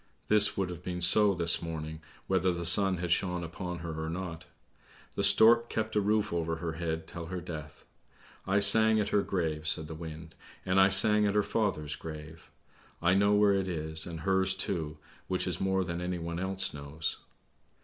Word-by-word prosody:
This 105 Hz, -1 st, +4 dB
would 95 Hz, -2 st, -2 dB
have 85 Hz, -1 st, -9 dB
been 90 Hz, 0 st, -5 dB
so 100 Hz, +3 st, +4 dB
this 85 Hz, -1 st, +1 dB
morning 80 Hz, -1 st, -6 dB, 0.2 s
whether 95 Hz, -1 st, +1 dB
the 85 Hz, -1 st, -5 dB
sun 95 Hz, +2 st, +5 dB
had 85 Hz, -1 st, -4 dB
shone 90 Hz, -1 st, 0 dB
upon 85 Hz, +1 st, -6 dB
her 80 Hz, -1 st, -5 dB
or 80 Hz, -, -4 dB
not. 85 Hz, -1 st, -6 dB, 0.7 s
The 100 Hz, -, -3 dB
stork 115 Hz, +4 st, +5 dB
kept 110 Hz, 0 st, -3 dB
a 105 Hz, -, +2 dB
roof 105 Hz, -1 st, 0 dB
over 85 Hz, -1 st, -2 dB
her 80 Hz, 0 st, -5 dB
head 80 Hz, 0 st, -4 dB
till 85 Hz, 0 st, -8 dB
her 90 Hz, +1 st, -5 dB
death! 75 Hz, -3 st, -9 dB, 0.6 s
I 100 Hz, +1 st, +2 dB
sang 110 Hz, +2 st, +5 dB
at 105 Hz, -, -1 dB
her 105 Hz, -, +2 dB
grave," 80 Hz, -6 st, -3 dB
said 80 Hz, 0 st, 0 dB
the 80 Hz, -, -8 dB
wind, 80 Hz, 0 st, -9 dB, 0.2 s
" -, -, -23 dB
and 95 Hz, +1 st, +3 dB
I 95 Hz, -, +5 dB
sang 105 Hz, +2 st, +6 dB
at 100 Hz, -, -1 dB
her 105 Hz, -, +3 dB
father's 85 Hz, -11 st, -2 dB
grave. 80 Hz, 0 st, -10 dB, 0.5 s
I 85 Hz, +1 st, +2 dB
know 100 Hz, +2 st, +3 dB
where 105 Hz, -1 st, +4 dB
it 95 Hz, -1 st, -1 dB
is, 80 Hz, -2 st, -4 dB
and 80 Hz, -2 st, -7 dB
her's 95 Hz, +1 st, +2 dB
too, 80 Hz, -5 st, -3 dB, 0.3 s
which -, -, 0 dB
is -, -, -3 dB
more 95 Hz, 0 st, 0 dB
than 85 Hz, -1 st, -5 dB
anyone 85 Hz, -1 st, -4 dB
else 95 Hz, +1 st, -1 dB
knows. 75 Hz, +2 st, -5 dB
90 Hz, 195 wpm, -29 LUFS, 80-100 Hz, 0.7 s, sang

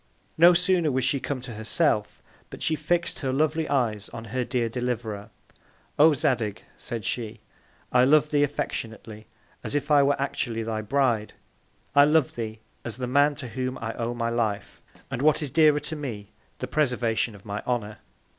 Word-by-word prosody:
No 170 Hz, +2 st, +7 dB
sooner 175 Hz, -3 st, +2 dB
was 130 Hz, -1 st, 0 dB
she 140 Hz, -, +2 dB
come 135 Hz, -1 st, -4 dB
to 125 Hz, -2 st, -8 dB
her 110 Hz, +1 st, -7 dB
self, 110 Hz, -3 st, 0 dB, 0.3 s
but -, -, -8 dB
she 160 Hz, -, +1 dB
fix'd 170 Hz, +3 st, -1 dB
her 135 Hz, -3 st, -1 dB
lovely 155 Hz, +3 st, 0 dB
Eyes 115 Hz, -7 st, 0 dB
on 115 Hz, 0 st, -8 dB
her 130 Hz, -1 st, 0 dB
Dear 120 Hz, -1 st, -1 dB
Deliverer. 115 Hz, -4 st, -3 dB, 0.7 s
O 155 Hz, +1 st, +7 dB
Zadig, 110 Hz, -6 st, -1 dB
said 115 Hz, -3 st, -6 dB
she, 115 Hz, -2 st, -3 dB, 0.5 s
I 125 Hz, 0 st, +5 dB
love 150 Hz, +3 st, +4 dB
thee 145 Hz, -1 st, +3 dB
as 145 Hz, -, +2 dB
affectionately, 110 Hz, -5 st, -5 dB, 0.4 s
as -, -, -3 dB
if 145 Hz, +1 st, -1 dB
I 145 Hz, -1 st, +7 dB
were 140 Hz, 0 st, +2 dB
actually 120 Hz, -4 st, -2 dB
thy 110 Hz, -1 st, -2 dB
Bride: 115 Hz, -2 st, 0 dB, 0.6 s
I 145 Hz, 0 st, +7 dB
love 150 Hz, -3 st, +3 dB
thee, 110 Hz, -1 st, -5 dB, 0.2 s
as 120 Hz, -2 st, -5 dB
the 125 Hz, -, -3 dB
Man, 145 Hz, +3 st, +3 dB
to 130 Hz, -4 st, -6 dB
whom 130 Hz, +1 st, -3 dB
I 115 Hz, 0 st, -4 dB
owe 120 Hz, +1 st, -3 dB
my 115 Hz, -1 st, -1 dB
Life, 110 Hz, -3 st, -2 dB, 0.3 s
and 130 Hz, -2 st, -3 dB
what 155 Hz, +1 st, +3 dB
is 140 Hz, -, -4 dB
dearer 150 Hz, 0 st, +5 dB
to 155 Hz, -, -4 dB
me, 115 Hz, -9 st, -6 dB, 0.3 s
the -, -, -4 dB
Preservation 125 Hz, -6 st, 0 dB
of 100 Hz, -, -16 dB
my 100 Hz, 0 st, -4 dB
Honour. 110 Hz, -4 st, -2 dB
125 Hz, 185 wpm, -26 LUFS, 115-145 Hz, 0.7 s, No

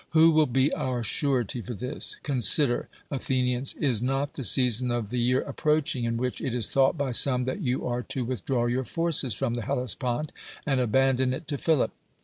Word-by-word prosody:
Who 160 Hz, +1 st, +6 dB
will 155 Hz, -1 st, +4 dB
be 130 Hz, +3 st, +1 dB
our 130 Hz, -5 st, -2 dB
surety 125 Hz, -2 st, -1 dB
for 120 Hz, +1 st, -6 dB
this? 125 Hz, +6 st, -2 dB
Consider, 125 Hz, -, +3 dB, 0.2 s
Athe 130 Hz, -1 st, 0 dB
nians, 125 Hz, +1 st, -2 dB
is 125 Hz, -7 st, +1 dB
not 135 Hz, +3 st, -1 dB
the 135 Hz, -, -6 dB
season 125 Hz, +1 st, +2 dB
of 120 Hz, -3 st, -2 dB
the 125 Hz, -, -1 dB
year 125 Hz, +2 st, +2 dB
approaching 150 Hz, -3 st, -1 dB
in 115 Hz, 0 st, -1 dB
which 125 Hz, +1 st, -3 dB
it 125 Hz, -, -2 dB
is 115 Hz, -4 st, +2 dB
thought 135 Hz, +3 st, +2 dB
by 140 Hz, -3 st, -1 dB
some 125 Hz, +1 st, +3 dB
that 130 Hz, +10 st, -3 dB
you 130 Hz, -4 st, -1 dB
are 125 Hz, 0 st, -1 dB
to 125 Hz, 0 st, -3 dB
withdraw 125 Hz, 0 st, -1 dB
your 125 Hz, +2 st, 0 dB
forces 160 Hz, -, -1 dB
from 120 Hz, +1 st, -2 dB
the 120 Hz, -, -3 dB
Hellespont, 125 Hz, +5 st, -2 dB, 0.3 s
and 135 Hz, -3 st, +1 dB
abandon 130 Hz, +1 st, +2 dB
it 145 Hz, -, -9 dB
to 145 Hz, -, -2 dB
Philip? 160 Hz, -5 st, +1 dB
130 Hz, 195 wpm, -26 LUFS, 120-140 Hz, 0.3 s, Who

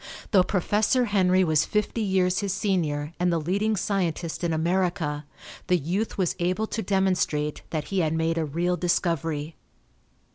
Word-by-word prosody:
Though 195 Hz, -, +6 dB
Professor 210 Hz, +7 st, +1 dB
Henry 190 Hz, -3 st, +3 dB
was 155 Hz, -3 st, +3 dB
fifty 210 Hz, +2 st, -1 dB
years 185 Hz, -3 st, +1 dB
his 200 Hz, -2 st, -1 dB
senior 155 Hz, -6 st, -1 dB
and 180 Hz, 0 st, +2 dB
the 170 Hz, -, +1 dB
leading 200 Hz, +7 st, 0 dB
scientist 175 Hz, -4 st, -2 dB
in 170 Hz, -, +1 dB
America, 165 Hz, -2 st, 0 dB, 0.4 s
the 180 Hz, -, +4 dB
youth 180 Hz, +8 st, -2 dB
was 185 Hz, -4 st, 0 dB
able 185 Hz, +5 st, 0 dB
to 220 Hz, -, -3 dB
demonstrate 185 Hz, -6 st, 0 dB
that 155 Hz, -2 st, -3 dB
he 195 Hz, -, 0 dB
had 160 Hz, -3 st, +1 dB
made 165 Hz, +1 st, 0 dB
a -, -, +1 dB
real 170 Hz, +5 st, 0 dB
discovery. 165 Hz, -3 st, -1 dB
180 Hz, 155 wpm, -26 LUFS, 160-195 Hz, 0.4 s, Though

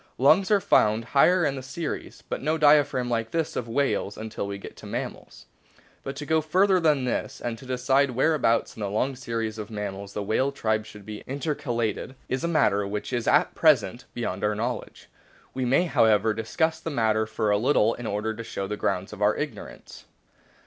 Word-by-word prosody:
Lungs 155 Hz, +9 st, +4 dB
are 210 Hz, -2 st, +5 dB
found 110 Hz, -, +3 dB
higher 175 Hz, +5 st, +5 dB
in 145 Hz, -, +1 dB
the 135 Hz, -, -5 dB
series, 135 Hz, +5 st, -6 dB
but -, -, -4 dB
no 155 Hz, +3 st, 0 dB
diaphragm 145 Hz, -4 st, +4 dB
like 115 Hz, -2 st, -1 dB
that 165 Hz, +2 st, -2 dB
of 120 Hz, -, -3 dB
whales 120 Hz, -5 st, 0 dB
until 110 Hz, -2 st, -5 dB
we 100 Hz, 0 st, -4 dB
get 100 Hz, -, -10 dB
to -, -, -10 dB
mammals. -, -, -6 dB, 0.6 s
But 135 Hz, -, -6 dB
to 145 Hz, +1 st, -6 dB
go 160 Hz, +2 st, +2 dB
further 185 Hz, +5 st, +3 dB
than 150 Hz, -6 st, +2 dB
this, 125 Hz, -, -2 dB
and 120 Hz, -1 st, -3 dB
to 130 Hz, -, -12 dB
decide 130 Hz, +2 st, +2 dB
where 130 Hz, +6 st, +2 dB
abouts 115 Hz, -6 st, +1 dB
in -, -, -12 dB
the 105 Hz, -, -2 dB
longr 125 Hz, +6 st, -1 dB
series 115 Hz, -3 st, -4 dB
of 105 Hz, -, -6 dB
mammals 100 Hz, -2 st, -5 dB
the 105 Hz, -, -3 dB
whale 130 Hz, +7 st, +1 dB
tribe 110 Hz, -5 st, 0 dB
o -, -, -13 dB
should 105 Hz, -2 st, -12 dB
be 105 Hz, 0 st, -8 dB
intercalated, 130 Hz, -4 st, -2 dB
is 130 Hz, 0 st, -2 dB
a -, -, +1 dB
matter 105 Hz, -11 st, +2 dB
which 105 Hz, +5 st, -4 dB
is 120 Hz, -2 st, -1 dB
at -, -, +3 dB
present -, -, +3 dB
beyond 95 Hz, +2 st, -3 dB
our 105 Hz, 0 st, +1 dB
knowledge. 120 Hz, +3 st, -4 dB, 0.5 s
We 130 Hz, -1 st, -2 dB
may, 135 Hz, +8 st, +3 dB
however, 110 Hz, -, +3 dB
discuss 160 Hz, +9 st, -1 dB
the 165 Hz, -, -5 dB
matter 110 Hz, -5 st, +1 dB
for 110 Hz, -1 st, -1 dB
a 105 Hz, -, +3 dB
little 115 Hz, -2 st, +3 dB
in 120 Hz, -1 st, -6 dB
order 105 Hz, +2 st, -2 dB
to 115 Hz, +1 st, -7 dB
show 100 Hz, -3 st, -4 dB
the 105 Hz, +2 st, -4 dB
grounds 95 Hz, +2 st, -2 dB
of 105 Hz, -, -10 dB
our 105 Hz, +1 st, +3 dB
ignorance. 145 Hz, -1 st, -7 dB
120 Hz, 205 wpm, -26 LUFS, 110-145 Hz, 0.6 s, are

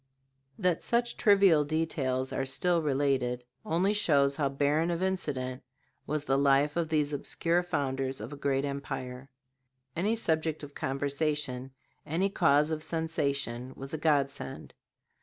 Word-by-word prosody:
That 180 Hz, -4 st, +1 dB
such 235 Hz, 0 st, 0 dB
trivial 195 Hz, -8 st, +5 dB
details 135 Hz, -4 st, -1 dB
are 135 Hz, -, -1 dB
still 170 Hz, +6 st, +2 dB
related, 135 Hz, -4 st, 0 dB, 0.2 s
only 180 Hz, +6 st, +1 dB
shows 140 Hz, -9 st, +3 dB
how 140 Hz, -2 st, 0 dB
barren 145 Hz, +4 st, +1 dB
of 170 Hz, +1 st, -1 dB
incident 135 Hz, -9 st, -2 dB, 0.5 s
was 150 Hz, 0 st, -1 dB
the 135 Hz, 0 st, +2 dB
life 140 Hz, +1 st, +3 dB
of 170 Hz, -2 st, 0 dB
these 150 Hz, -2 st, +1 dB
obscure 165 Hz, +4 st, 0 dB
founders 135 Hz, -6 st, -2 dB
of 110 Hz, +7 st, -7 dB
a -, -, -5 dB
great 140 Hz, -1 st, 0 dB
empire. 135 Hz, -2 st, -5 dB, 0.7 s
Any 205 Hz, +7 st, +1 dB
subject 160 Hz, -7 st, 0 dB
of 145 Hz, 0 st, -9 dB
conversation, 140 Hz, -1 st, -1 dB, 0.3 s
any 175 Hz, +6 st, 0 dB
cause 145 Hz, -2 st, +3 dB
of 155 Hz, -1 st, -2 dB
sensation, 140 Hz, -6 st, -1 dB
was 135 Hz, +2 st, -8 dB
a 160 Hz, -, -2 dB
godsend. 145 Hz, -3 st, -1 dB
145 Hz, 140 wpm, -30 LUFS, 135-165 Hz, 0.7 s, trivial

